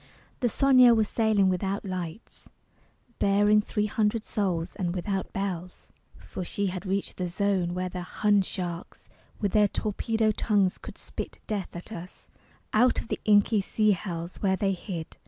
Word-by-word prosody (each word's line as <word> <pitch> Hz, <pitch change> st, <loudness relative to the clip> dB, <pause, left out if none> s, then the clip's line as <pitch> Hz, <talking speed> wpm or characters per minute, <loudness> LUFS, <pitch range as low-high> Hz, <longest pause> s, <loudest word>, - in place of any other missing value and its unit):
The 245 Hz, -, +1 dB
Sonia 255 Hz, -1 st, +6 dB
was 220 Hz, -2 st, +2 dB
sailing 215 Hz, -4 st, +2 dB
without 190 Hz, +3 st, -1 dB
lights 185 Hz, +1 st, -6 dB, 0.7 s
Bearing 205 Hz, +1 st, +4 dB
three 210 Hz, 0 st, -1 dB
hundred 215 Hz, +1 st, 0 dB
souls 185 Hz, -5 st, -1 dB
and 180 Hz, -3 st, -2 dB
without 190 Hz, +1 st, -2 dB
bells; 185 Hz, -2 st, -5 dB, 0.3 s
For 185 Hz, -, -7 dB
she 200 Hz, +3 st, -2 dB
had 190 Hz, +1 st, -6 dB
reached 195 Hz, +1 st, -2 dB
the 180 Hz, -, -2 dB
"Zone," 180 Hz, -1 st, 0 dB
where 185 Hz, 0 st, -1 dB
the 180 Hz, 0 st, -5 dB
Hun 205 Hz, +3 st, +2 dB
sharks 180 Hz, -2 st, -5 dB, 0.3 s
With 200 Hz, -2 st, 0 dB
their 210 Hz, 0 st, +5 dB
torpedo 220 Hz, +2 st, 0 dB
tongues 205 Hz, -3 st, +1 dB
could -, -, -10 dB
spit -, -, -6 dB
death 205 Hz, -5 st, -4 dB
at 175 Hz, +5 st, -8 dB
us 180 Hz, -3 st, -9 dB, 0.4 s
Out 245 Hz, +3 st, +4 dB
of -, -, -8 dB
the -, -, -2 dB
inky 210 Hz, 0 st, +4 dB
sea 215 Hz, +2 st, +2 dB
hells 175 Hz, -3 st, -4 dB
where 190 Hz, -2 st, +1 dB
they 195 Hz, +1 st, +1 dB
hid. 175 Hz, -3 st, -6 dB
200 Hz, 160 wpm, -27 LUFS, 180-215 Hz, 0.7 s, Sonia